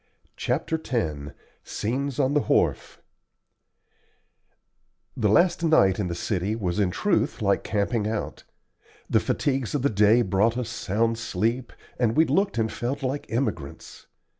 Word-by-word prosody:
CHAPTER 160 0 -2
X 75 - -2 0.3
SCENES 130 +4 -3
ON 135 0 +1
THE 150 - +4
WHARF - - 0 2.1
The 110 -4 +1
last 170 - +3
night 100 - +4
in 100 - -1
the 85 - -3
city 95 +3 -2
flat 115 - -7
was 90 +1 -1
in 100 -3 +2
truth 175 - 0
like 100 -3 +1
camping 105 +1 -1
out, 110 -1 -4 0.6
the - - +3
fatigues 135 -3 -1
of 140 - -1
the 140 - +2
day 105 +3 +4
brought 105 +4 +1
us 125 -2 -3
sound 115 +1 -1
sleep, 115 +4 -2 0.3
and 115 -2 +1
we 160 - +6
looked 195 - +1
and 110 -1 0
felt 135 +4 -3
like 135 +2 -3
emigrants. 110 - -4
115 Hz, 145 wpm, -25 LUFS, 100-130 Hz, 2.1 s, we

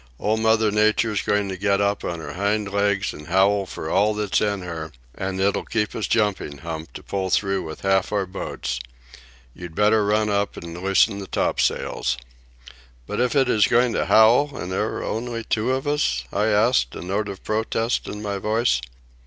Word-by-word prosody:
"Old 110 +1 0
Mother 110 -1 +3
Nature's 105 0 +2
going 105 -1 0
to 95 - -3
get 100 +1 +1
up 100 0 0
on 85 - -3
her - - -7
hind 100 +1 -1
legs 100 0 +1
and 75 - -11
howl 95 +2 +3
for 80 - -6
all 105 +5 +2
that's 105 -2 0
in 100 -3 -1
her, 80 -3 -6 0.2
and 95 0 -4
it'll 100 +1 +1
keep 105 -2 -1
us 110 - -2
jumping, 105 -9 0
Hump, 80 +2 -6
to - - -9
pull 95 -1 -3
through 95 +1 +1
with 80 0 -8
half 95 0 +1
our 100 -2 0
boats. 65 -9 -4 0.7
You'd 85 +1 -9
better 105 +2 +4
run 105 +1 +2
up 100 -1 -1
and 85 0 -7
loosen 95 +3 +2
the 100 - -7
topsails." - - 0 0.9
"But - - -4
if 125 +1 +1
it 135 -2 +4
is 105 -5 +4
going 120 0 +3
to - - 0
howl, 120 +6 +5
and 90 - -5
there 105 +3 0
are - - -4
only 115 0 -3
two 110 +3 0
of 130 0 -1
us?" 145 - +1
I 105 +2 +1
asked, 110 +4 +2
a - - -6
note 100 +3 -2
of 95 -1 -8
protest 110 +2 -1
in 105 0 -6
my 100 -1 -3
voice. 110 - +1
105 Hz, 195 wpm, -23 LUFS, 95-110 Hz, 0.9 s, howl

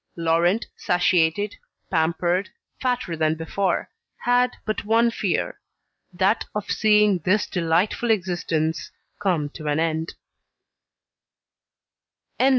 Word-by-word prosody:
Laurent 170 +5 +2
satiated, 180 +2 +1 0.4
pampered, 175 +3 +1 0.3
fatter 250 -9 -1
than 155 0 +1
before, 170 +3 -1 0.3
had 245 +1 +3 0.2
but 215 -1 -2
one 230 +2 +3
fear, - - -2 0.5
that 190 +4 +1
of 210 -1 -3
seeing 210 -3 +4
this 185 +6 +2
delightful 180 +7 0
existence 175 -6 0 0.3
come 175 -7 0
to 155 +1 -8
an 150 +1 +1
end. 160 0 -1
180 Hz, 95 wpm, -23 LUFS, 165-210 Hz, 0.5 s, seeing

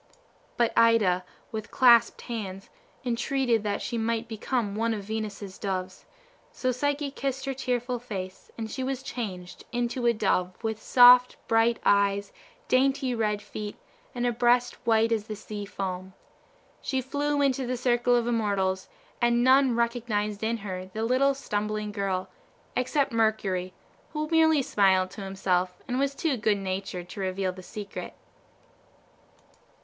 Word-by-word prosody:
But 235 -1 +2
Ida, 215 -6 +4 0.3
with 220 -1 -5
clasped 240 -3 +5
hands, 195 -5 -6 0.3
entreated 245 -1 +1
that 205 -1 -2
she 235 - -2
might 230 +1 -1
become 220 -1 -2
one 225 +1 0
of 205 - -6
Venus's 205 -2 -5
Doves; 185 -2 -4 0.5
so 255 - -1
Psyche 285 +3 -1
kissed 270 -1 -3
her 270 - -1
tearful 250 -1 -2
face, 190 -6 -7
and 220 -1 -5
she 260 - -3
was 265 0 -3
changed 190 -9 -6
into 240 0 -1
a 235 - +5
dove 185 -4 0
with 220 -1 -2
soft, 250 0 +7
bright 225 +1 +3
eyes, 200 0 +2 0.3
dainty 265 0 +2
red 210 -3 -1
feet, 210 -1 -6 0.4
and 245 0 -1
a 245 - +2
breast 240 +1 +3
white 225 0 +4
as 220 -2 0
the 215 - -4
sea 205 0 -7
foam. 190 -1 -5 0.7
She 265 - -1
flew 285 +3 -1
into 270 -2 +1
the 250 0 -1
circle 245 0 +2
of 240 -1 +2
immortals, 200 -5 0 0.3
and 240 0 +3
none 260 -1 +5
recognized 225 -3 -1
in 230 +1 0
her 185 -1 -5
the 215 +4 -4
little 265 +4 +3
stumbling 210 -3 -3
girl, 195 -3 -2 0.5
except 270 +2 +1
Mercury, 210 -5 0 0.4
who 305 0 -2
merely 320 -3 +4
smiled 190 -4 +3
to 205 - -9
himself, 185 -2 -1
and 250 +1 -1
was 275 0 0
too 295 -4 0
good 210 -1 +2
natured 185 -2 -4
to 200 - -8
reveal 190 0 -1
the 185 0 -11
secret. 205 +2 -7
225 Hz, 150 wpm, -27 LUFS, 200-250 Hz, 0.7 s, soft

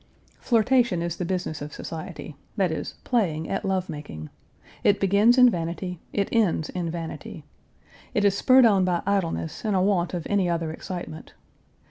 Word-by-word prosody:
Flirtation 235 -6 +2
is 170 0 -3
the 180 - -2
business 175 -4 -3
of 145 +1 -7
society; 160 -1 -7 0.2
that 190 -4 +2
is, 160 - -4
playing 170 -10 0
at 195 - -2
Page - - -4
339 190 - +2
love 185 0 -2
making. 145 - -7 0.5
It 205 - +4
begins 200 +5 +4
in 250 -1 +8
vanity, 175 -2 -2
it 200 -1 0
ends 195 -9 +1
in 175 -2 -3
vanity. 165 -1 -6 0.7
It 205 - +2
is 200 -1 +4
spurred 255 +4 +6
on 200 -4 +4
by 180 -2 0
idleness 185 -5 -1
and 210 -3 0
a 185 - +3
want 185 -3 +1
of 170 - -4
any 195 -3 +1
other 165 -2 -1
excitement. 175 -1 -7
180 Hz, 175 wpm, -25 LUFS, 165-205 Hz, 0.7 s, in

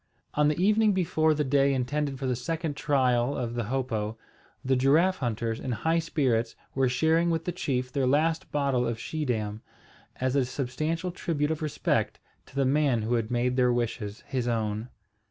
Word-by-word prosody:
On 150 0 +3
the 150 +2 0
evening 210 +2 +4
before 160 -4 +2
the 150 - +1
day 140 0 +3
intended 140 +2 -1
for 135 - -4
the 130 -1 +1
second 160 +4 -3
trial 130 -3 +1
of 120 -1 -3
the 120 -2 -2
hopo, 115 -3 -2 0.5
the 130 0 +3
giraffe 155 +9 +3
hunters, 115 -2 -2
in 130 - -4
high 160 +8 +1
spirits, 130 -8 0 0.2
were 135 -1 +2
sharing 160 +6 +2
with 165 -1 -1
the 180 - -1
chief 130 -7 -2
their 135 -3 +1
last 160 +4 +1
bottle 140 -4 +1
of 115 - -2
Schiedam, 110 -9 -2 0.5
as 130 +1 -1
a 140 - +4
substantial 155 +7 -2
tribute 155 -3 -1
of 160 - -3
respect 155 -2 -1 0.3
to - - -18
the 140 -1 +2
man 135 -4 +2
who 115 +3 -1
had 115 -2 0
made 125 +1 0
their 125 -1 +4
wishes 115 -3 -3
his 125 -3 -2
own. 110 0 -1
135 Hz, 180 wpm, -27 LUFS, 120-155 Hz, 0.5 s, evening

